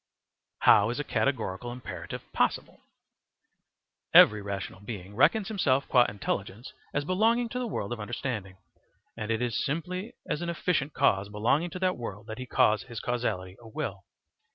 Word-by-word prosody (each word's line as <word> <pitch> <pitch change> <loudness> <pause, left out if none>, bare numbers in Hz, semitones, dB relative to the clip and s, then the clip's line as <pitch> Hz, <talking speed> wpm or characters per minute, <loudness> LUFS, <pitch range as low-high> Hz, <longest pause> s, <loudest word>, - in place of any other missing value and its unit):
How 105 +1 +6
is 120 - -3
a - - 0
Categorical 120 -6 -1
Imperative 125 +1 -7
Possible? - - 0 1.4
Every 105 -1 +8
rational 100 -1 -5
being 100 -2 -8
reckons 195 - +4
himself 140 -11 +1
qua 125 -2 +5
intelligence 105 +2 -4 0.2
as 145 0 -1
belonging 225 +7 +2
to 250 - -3
the 250 - -2
world 120 - -3
of 120 - -6
understanding, 105 -3 -4 0.6
and 110 -1 -5
it 115 +1 0
is 120 -3 0
simply 180 +8 -3
as 150 - -2
an 175 - -2
efficient 165 -4 -1
cause 100 +1 +2
belonging 115 +11 +1
to 180 - -7
that 185 -1 +1
world 110 -3 -6
that 110 +1 -7
he 130 - -6
calls 110 -2 +3
his 120 -2 -7
causality 105 -7 -2
a 115 - -12
will. 110 - -5
120 Hz, 160 wpm, -28 LUFS, 105-155 Hz, 1.4 s, Every